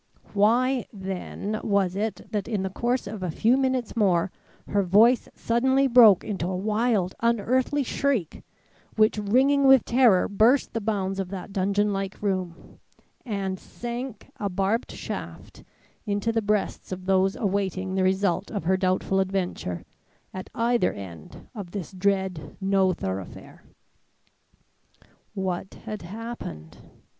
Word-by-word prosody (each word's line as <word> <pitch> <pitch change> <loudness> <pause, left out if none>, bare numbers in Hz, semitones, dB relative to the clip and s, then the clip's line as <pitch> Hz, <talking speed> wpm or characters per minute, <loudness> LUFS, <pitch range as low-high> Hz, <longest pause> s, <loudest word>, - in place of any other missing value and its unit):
Why, 240 +5 +2
then, 195 +1 -5
was 195 -3 +1
it 215 +2 -2
that 205 -2 -2
in 210 -5 -1
the 190 - -3
course 240 +5 -1
of 210 -3 -6
a 180 - -2
few 225 +9 +3
minutes 260 -4 0
more 190 -5 +2 0.4
her 205 - +2
voice 215 +7 +4
suddenly 260 +4 +2
broke 235 -7 +7
into 190 -5 -3
a 185 0 -2
wild, 210 -1 0
unearthly 245 +5 +1
shriek, 255 - -1 0.5
which 215 0 +3
ringing 270 +7 +3
with 265 -2 +7
terror 235 -6 +4
burst 225 +7 +3
the 225 - -2
bounds 195 -2 -1
of 190 -2 -3
that 195 +1 -7
dungeon 200 +1 +1
like 195 -1 -4
room, 185 -4 -4 0.5
and 195 -3 -2
sank, 240 -1 -7
a 205 - -2
barbed 195 +5 -1
shaft, - - -7 0.4
into 205 +2 0
the 225 0 0
breasts 210 -2 -1
of 185 0 -5
those 190 0 +2
awaiting 190 -2 -1
the 190 - +1
result 190 0 +1
of 205 -6 -4
her 185 +3 +2
doubtful 185 0 +1
adventure, 185 - -2 0.5
at 185 - -7
either 235 +1 +2
end 85 -6 -10
of 200 -7 -7
this 185 -3 -6
dread 190 -3 -1
no 195 -1 +2
thoroughfare. 95 - -6 1.7
What 190 -1 -3
had 215 -2 -5
happened? 185 - -8
200 Hz, 135 wpm, -25 LUFS, 190-230 Hz, 1.7 s, broke